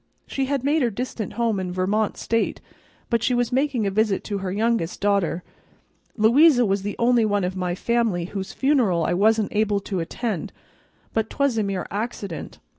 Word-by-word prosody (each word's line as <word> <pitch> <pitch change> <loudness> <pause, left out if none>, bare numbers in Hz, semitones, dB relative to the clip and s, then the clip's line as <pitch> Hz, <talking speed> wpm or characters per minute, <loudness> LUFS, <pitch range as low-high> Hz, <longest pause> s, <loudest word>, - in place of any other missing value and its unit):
She 270 - -2
had 275 -1 -1
made 300 +3 +2
her 245 - +2
distant 230 -1 -4
home 230 -4 0
in 185 -1 -3
Vermont 200 +4 0
State, 230 0 -1 0.5
but 235 -1 +2
she 250 - +1
was 240 0 0
making 260 -3 +1
a 195 - 0
visit 210 -1 +1
to 205 -2 -3
her 190 -1 -3
youngest 215 -4 0
daughter. 200 -4 +1 0.7
Louisa 245 +4 +5
was 195 -1 0
the 205 +1 -4
only 240 0 +3
one 205 -2 +1
of 180 +1 -2
my 180 -1 -2
family 225 -5 0
whose 195 +1 -5
funeral 240 - +2
I - - +1
wasn't 215 +3 +2
able 210 -1 +2
to 195 -1 -3
attend, 185 +2 -3 0.6
but 220 -1 0
'twas 280 -5 +1
a - - +2
mere 195 -3 -2
accident. 200 -5 -5
215 Hz, 185 wpm, -23 LUFS, 195-240 Hz, 0.7 s, Louisa